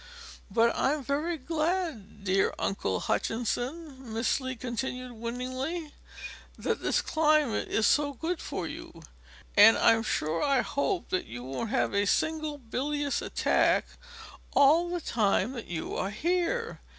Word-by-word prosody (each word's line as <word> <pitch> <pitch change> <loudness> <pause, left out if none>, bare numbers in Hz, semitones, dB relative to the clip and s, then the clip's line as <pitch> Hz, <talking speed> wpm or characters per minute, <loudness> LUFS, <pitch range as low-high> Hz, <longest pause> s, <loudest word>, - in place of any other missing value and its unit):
But 230 0 +3
I'm 290 +1 +1
very 300 +6 -1
glad, 315 - -2
dear 195 0 +2
Uncle 95 - -1
Hutchinson," 260 +3 -2
Miss 225 +4 +1
Lee 260 0 -4
continued, 250 +1 -4
winningly, 255 +7 -4 0.6
"that - - -2
this - - +1
climate 305 -6 +2
is 220 - +1
so 290 +3 +3
good 330 +6 -3
for - - -4
you, - - -9 0.5
and 210 +2 +8
I'm 225 -1 +5
sure 165 -7 -1
I 275 -3 +3
hope 345 +9 -1
that 185 - -1
you 120 +2 -7
won't 135 - -4
have - - 0
a 200 0 +2
single 310 +4 0
bilious 285 +3 -2
attack - - +2 0.7
all 315 +5 +5
the 350 -1 -2
time 215 -3 +1
that 235 -4 -7
you 165 -2 -4
are 190 - -1
here. 360 - -1
260 Hz, 140 wpm, -29 LUFS, 225-310 Hz, 0.7 s, and